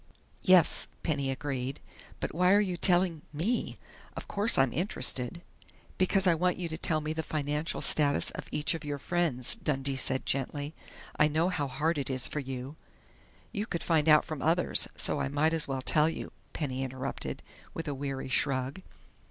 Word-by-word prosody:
"Yes," 185 Hz, -4 st, +5 dB, 0.2 s
Penny 140 Hz, -4 st, -1 dB
agreed. 135 Hz, -1 st, -3 dB, 0.4 s
"But -, -, -3 dB
why 180 Hz, +3 st, +4 dB
are 205 Hz, -, +6 dB
you 190 Hz, -4 st, 0 dB
telling 175 Hz, -3 st, +2 dB
me?... 180 Hz, +12 st, -2 dB, 0.4 s
Of -, -, -7 dB
course 205 Hz, +4 st, +3 dB
I'm 135 Hz, -3 st, +3 dB
interested 140 Hz, -, -1 dB, 0.3 s
" -, -, -27 dB
"Because 190 Hz, +1 st, +2 dB
I 180 Hz, -, +5 dB
want 180 Hz, +2 st, +1 dB
you 180 Hz, -, -3 dB
to 160 Hz, -, -4 dB
tell 155 Hz, -4 st, +1 dB
me 155 Hz, +1 st, -3 dB
the 160 Hz, -, -2 dB
financial 150 Hz, 0 st, -2 dB
status 145 Hz, -2 st, +3 dB
of -, -, -8 dB
each 150 Hz, +1 st, 0 dB
of 165 Hz, -, -6 dB
your 145 Hz, -1 st, -3 dB
friends," 145 Hz, -5 st, 0 dB
Dundee 140 Hz, -9 st, -2 dB
said 130 Hz, 0 st, +2 dB
gently. 145 Hz, +3 st, -2 dB, 0.5 s
"I 150 Hz, -, +6 dB
know 160 Hz, +4 st, +1 dB
how 150 Hz, -6 st, -1 dB
hard 155 Hz, +3 st, -1 dB
it 140 Hz, -, -3 dB
is 130 Hz, -2 st, +5 dB
for 150 Hz, -, -4 dB
you 135 Hz, +2 st, -6 dB, 0.4 s
" -, -, -29 dB, 0.3 s
"You 210 Hz, 0 st, -3 dB
could 170 Hz, -, -3 dB
find 160 Hz, -2 st, +2 dB
out 150 Hz, 0 st, +6 dB
from 155 Hz, -4 st, -5 dB
others, 170 Hz, +3 st, +2 dB
so -, -, -1 dB
I -, -, 0 dB
might 150 Hz, +3 st, +1 dB
as 160 Hz, -2 st, +1 dB
well 135 Hz, -1 st, -2 dB
tell 155 Hz, +3 st, +4 dB
you," -, -, -6 dB, 0.2 s
Penny 135 Hz, -4 st, -3 dB
interrupted, 130 Hz, 0 st, -5 dB, 0.3 s
with 165 Hz, -, -5 dB
a 145 Hz, -, -1 dB
weary 135 Hz, -1 st, -4 dB
shrug. 135 Hz, +4 st, 0 dB
150 Hz, 185 wpm, -30 LUFS, 135-170 Hz, 0.5 s, are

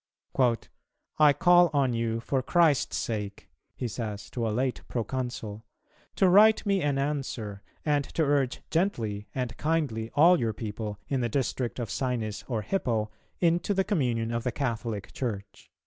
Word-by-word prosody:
'" -, -, -49 dB, 0.8 s
"I 150 Hz, -1 st, +7 dB
call 175 Hz, +3 st, +5 dB
on 135 Hz, -4 st, +2 dB
you 115 Hz, 0 st, -1 dB
for 130 Hz, +2 st, 0 dB
Christ's 160 Hz, -1 st, +2 dB
sake," 105 Hz, -3 st, -4 dB, 0.2 s
he 125 Hz, -, -3 dB
says 105 Hz, -3 st, -5 dB
to 115 Hz, -2 st, -2 dB
a -, -, 0 dB
late 125 Hz, +4 st, -1 dB
pro 120 Hz, -, -2 dB
consul, 120 Hz, -3 st, -5 dB, 0.5 s
"to 190 Hz, -, +4 dB
write 215 Hz, +5 st, +6 dB
me 200 Hz, -2 st, +2 dB
an 145 Hz, -3 st, +1 dB
answer, 135 Hz, -8 st, -3 dB, 0.2 s
and 145 Hz, -2 st, +2 dB
to 165 Hz, -, +3 dB
urge 140 Hz, -3 st, +1 dB
gently 115 Hz, -, -1 dB
and 125 Hz, -3 st, -2 dB
kindly 145 Hz, -9 st, -1 dB
all 170 Hz, +4 st, +6 dB
your 115 Hz, -2 st, 0 dB
people 105 Hz, -1 st, -5 dB
in 135 Hz, -2 st, 0 dB
the 120 Hz, -, 0 dB
district 125 Hz, 0 st, -1 dB
of 120 Hz, -5 st, -4 dB
Sinis 120 Hz, -5 st, -2 dB
or 115 Hz, -5 st, -2 dB
Hippo 110 Hz, -, -1 dB, 0.3 s
into 175 Hz, +3 st, +2 dB
the 190 Hz, -, +3 dB
communion 125 Hz, -, 0 dB
of 115 Hz, 0 st, -2 dB
the 125 Hz, -, 0 dB
Catholic 115 Hz, -6 st, -3 dB
Church." 100 Hz, -6 st, -5 dB
125 Hz, 165 wpm, -28 LUFS, 110-150 Hz, 0.8 s, I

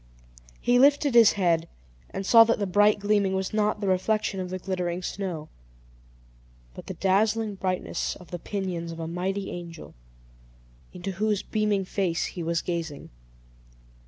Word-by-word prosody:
He 245 Hz, 0 st, +3 dB
lifted 285 Hz, 0 st, +4 dB
his 235 Hz, -3 st, +7 dB
head, 170 Hz, -4 st, +1 dB, 0.4 s
and 195 Hz, -, -5 dB
saw 230 Hz, +2 st, +8 dB
that 230 Hz, -, +1 dB
the 205 Hz, -, -1 dB
bright 205 Hz, +3 st, +4 dB
gleaming 205 Hz, -1 st, +1 dB
was 190 Hz, +1 st, -2 dB
not 210 Hz, 0 st, 0 dB
the 200 Hz, -, -1 dB
reflection 195 Hz, +1 st, 0 dB
of 185 Hz, -1 st, -4 dB
the 185 Hz, -, -3 dB
glittering 180 Hz, -1 st, -3 dB
snow, 175 Hz, -6 st, -4 dB, 1.3 s
but -, -, -11 dB
the -, -, -5 dB
dazzling 210 Hz, +3 st, +1 dB
brightness 185 Hz, -1 st, -2 dB
of 180 Hz, -, -15 dB
the 175 Hz, -, -5 dB
pinions 180 Hz, -4 st, -4 dB
of 165 Hz, -, -8 dB
a 165 Hz, -, -4 dB
mighty 190 Hz, +4 st, -3 dB
angel, 170 Hz, -2 st, -9 dB, 1.0 s
into 185 Hz, +2 st, -5 dB
whose 210 Hz, +1 st, -1 dB
beaming 210 Hz, -3 st, 0 dB
face 180 Hz, -3 st, -1 dB
he 175 Hz, -, -5 dB
was 170 Hz, 0 st, -1 dB
gazing. 165 Hz, -5 st, -4 dB
190 Hz, 155 wpm, -26 LUFS, 175-210 Hz, 1.3 s, saw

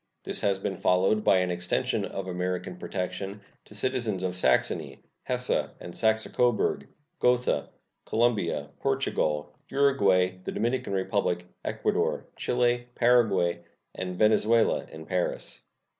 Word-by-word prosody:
This -, -, -4 dB
has 100 Hz, -1 st, +2 dB
been 95 Hz, -1 st, -3 dB
followed 95 Hz, +4 st, +2 dB
by 95 Hz, -, +5 dB
an 90 Hz, -1 st, +1 dB
extension 90 Hz, 0 st, -1 dB
of 95 Hz, -1 st, -5 dB
American 90 Hz, -, -3 dB
protection 95 Hz, -, -4 dB, 0.3 s
to 105 Hz, -, -11 dB
citizens 115 Hz, -4 st, 0 dB
of 90 Hz, -1 st, -1 dB
Saxony, 90 Hz, -, +1 dB, 0.3 s
Hesse -, -, +1 dB
and 85 Hz, -, -9 dB
Saxe 110 Hz, 0 st, +2 dB
Coburg, 120 Hz, -3 st, +1 dB, 0.3 s
Gotha, 125 Hz, 0 st, +2 dB, 0.4 s
Colombia, 105 Hz, -11 st, +1 dB
Portugal, 75 Hz, -1 st, 0 dB, 0.2 s
Uruguay, 95 Hz, -10 st, +3 dB
the -, -, -4 dB
Dominican 120 Hz, -1 st, -1 dB
Republic, 95 Hz, -2 st, 0 dB, 0.2 s
Ecuador, -, -, -1 dB
Chile, 120 Hz, 0 st, +1 dB
Paraguay, 100 Hz, -8 st, +3 dB, 0.3 s
and 90 Hz, -1 st, -5 dB
Venezuela 110 Hz, +2 st, +3 dB
in 80 Hz, 0 st, -9 dB
Paris. 90 Hz, 0 st, -2 dB
95 Hz, 120 wpm, -27 LUFS, 90-115 Hz, 0.4 s, by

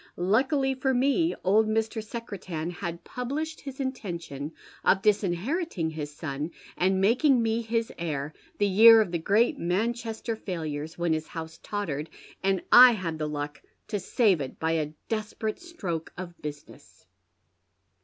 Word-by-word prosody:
Luckily 265 Hz, -, +2 dB
for 265 Hz, 0 st, 0 dB
me, 280 Hz, +7 st, +2 dB
old 215 Hz, +4 st, +4 dB
Mr. 220 Hz, 0 st, -1 dB
Secretan 190 Hz, -8 st, -5 dB
had 170 Hz, 0 st, -6 dB
published 290 Hz, +6 st, -4 dB
his 275 Hz, -1 st, -8 dB
intention 170 Hz, -, -4 dB, 0.3 s
of 190 Hz, -, +3 dB
disinheriting 205 Hz, -, 0 dB
his 150 Hz, -2 st, -5 dB
son, 145 Hz, 0 st, -4 dB, 0.3 s
and 190 Hz, +1 st, +2 dB
making 250 Hz, +7 st, +4 dB
me 225 Hz, 0 st, +1 dB
his 230 Hz, 0 st, -1 dB
heir, 150 Hz, -3 st, -3 dB, 0.2 s
the 205 Hz, -, +2 dB
year 225 Hz, +3 st, +8 dB
of 210 Hz, -5 st, +1 dB
the 170 Hz, -, -1 dB
great 225 Hz, -, +2 dB
Manchester 225 Hz, +5 st, -1 dB
failures, 160 Hz, -6 st, -5 dB
when 170 Hz, -1 st, +1 dB
his 155 Hz, 0 st, -2 dB
house 160 Hz, -1 st, -7 dB
tottered, 160 Hz, -8 st, -3 dB, 0.3 s
and 195 Hz, -2 st, +1 dB
I 250 Hz, 0 st, +10 dB
had 170 Hz, -7 st, -4 dB
the 155 Hz, -, -1 dB
luck 145 Hz, 0 st, -5 dB, 0.3 s
to 205 Hz, -, -1 dB
save 195 Hz, -, +2 dB
it 130 Hz, -, -6 dB
by 160 Hz, 0 st, 0 dB
a 155 Hz, -2 st, -1 dB
desperate 215 Hz, 0 st, -3 dB
stroke 195 Hz, -, -5 dB
of 175 Hz, -1 st, -8 dB
business." 145 Hz, -10 st, -10 dB
195 Hz, 145 wpm, -27 LUFS, 160-230 Hz, 0.3 s, I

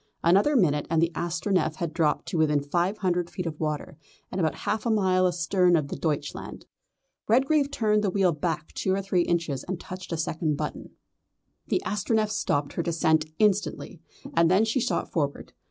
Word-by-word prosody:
Another 200 Hz, -, +4 dB
minute 150 Hz, -, +2 dB
and 165 Hz, -1 st, +2 dB
the 165 Hz, +1 st, +2 dB
Astronef 170 Hz, -1 st, -1 dB
had 170 Hz, -3 st, -4 dB
dropped 160 Hz, -3 st, +1 dB
to 175 Hz, -, -1 dB
within 150 Hz, -2 st, +2 dB
five 175 Hz, +7 st, 0 dB
hundred 180 Hz, -2 st, 0 dB
feet 180 Hz, -3 st, -5 dB
of 160 Hz, -2 st, -5 dB
the -, -, -2 dB
water, 150 Hz, +1 st, -4 dB, 0.3 s
and 185 Hz, -, -2 dB
about 160 Hz, -2 st, +1 dB
half 215 Hz, -, 0 dB
a 235 Hz, -, -1 dB
mile 185 Hz, -4 st, +3 dB
astern 175 Hz, +1 st, +2 dB
of 150 Hz, -4 st, 0 dB
the -, -, -4 dB
Deutschland. 145 Hz, -3 st, -4 dB, 0.6 s
Redgrave 275 Hz, +5 st, +3 dB
turned 215 Hz, -6 st, +1 dB
the 200 Hz, -, +2 dB
wheel 185 Hz, -1 st, +2 dB
back 155 Hz, 0 st, -3 dB
two 190 Hz, -1 st, 0 dB
or 195 Hz, -, -2 dB
three 190 Hz, -2 st, +1 dB
inches 165 Hz, -6 st, -1 dB
and 185 Hz, -1 st, -4 dB
touched 185 Hz, 0 st, -8 dB
a 165 Hz, -, -1 dB
second 155 Hz, -1 st, -1 dB
button. -, -, -5 dB, 0.8 s
The -, -, 0 dB
Astronef 215 Hz, +1 st, 0 dB
stopped 145 Hz, -9 st, -1 dB
her -, -, -1 dB
descent 160 Hz, -2 st, +2 dB
instantly, 205 Hz, -5 st, 0 dB, 0.3 s
and 165 Hz, 0 st, +4 dB
then 190 Hz, +5 st, +4 dB
she 225 Hz, +4 st, 0 dB
shot 250 Hz, +1 st, -1 dB
forward. 145 Hz, -4 st, -2 dB
175 Hz, 185 wpm, -26 LUFS, 160-200 Hz, 0.8 s, Another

